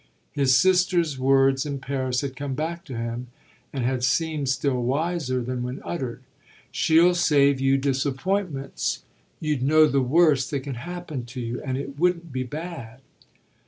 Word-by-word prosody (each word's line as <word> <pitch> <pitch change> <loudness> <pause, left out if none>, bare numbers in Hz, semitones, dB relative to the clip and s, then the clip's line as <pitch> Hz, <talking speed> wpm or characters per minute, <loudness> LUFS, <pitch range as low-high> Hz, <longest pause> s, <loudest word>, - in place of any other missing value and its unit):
His 135 -2 +3
sister's 180 -5 +2
words 135 0 +3
in 145 -2 -3
Paris 130 -2 -2
had 135 -2 -4
come 140 0 -4
back 165 +3 -3
to 130 -4 -7
him 115 +2 -4 0.4
and 130 -4 -2
had 125 0 -1
seemed 150 +1 0
still 130 -1 0
wiser 135 0 -1
than 125 +1 -3
when 125 +2 -4
uttered: 130 -9 -4 0.5
"She'll 170 +3 +4
save 140 -5 +3
you 135 0 +3
disappointments; 140 +3 -1 0.4
you'd 150 -4 -1
know 155 +4 +5
the 140 -2 +2
worst 140 -1 +3
that 140 -2 -2
can 140 0 -5
happen 155 -1 -6
to 120 +1 -8
you, 120 0 -4
and 130 -3 -3
it 140 +1 -6
wouldn't 170 -3 0
be 130 - -1
bad." 135 -3 -7
140 Hz, 160 wpm, -24 LUFS, 130-155 Hz, 0.5 s, know